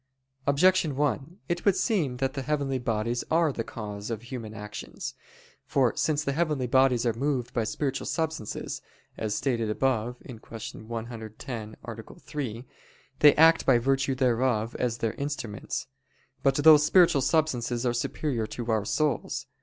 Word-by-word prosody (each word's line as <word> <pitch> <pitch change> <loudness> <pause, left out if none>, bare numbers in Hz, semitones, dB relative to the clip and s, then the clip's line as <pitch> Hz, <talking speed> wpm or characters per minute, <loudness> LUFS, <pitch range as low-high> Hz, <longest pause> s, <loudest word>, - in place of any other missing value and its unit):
Objection 160 +1 +4
1: 145 +4 -1
It 175 0 -2
would 200 -3 +4
seem 165 - 0
that 135 0 -1
the 140 - -3
heavenly 140 -1 -1
bodies 115 0 -1
are 160 -2 +3
the 115 - -2
cause 105 -2 -6
of 115 -1 -4
human 120 -3 -7
actions. 105 0 -7 0.5
For 130 -4 +2
since 150 0 +1
the 140 - 0
heavenly 150 -3 0
bodies 125 -1 +3
are 115 - +2
moved 130 0 -1
by 115 -2 0
spiritual 135 +4 -2
substances, 160 -9 -3 0.3
as 110 -1 -2
stated 120 -5 0
above 120 0 0
(Q. 120 -4 -9 0.5
110, 115 0 -6
A. 115 +7 -9
3), 130 -8 -5 0.5
they 145 -1 +7
act 160 +1 +6
by 130 -3 +6
virtue 135 +2 +1
thereof 120 -3 +1
as 120 -2 0
their 115 -2 -1
instruments. 140 -7 -4 0.6
But 135 -1 +3
those 150 +1 +7
spiritual 165 -2 +5
substances 130 -4 +1
are 120 - +2
superior 120 -1 -2
to 120 +1 -4
our 110 -2 +1
souls. 150 +5 -1
130 Hz, 150 wpm, -27 LUFS, 115-145 Hz, 0.6 s, they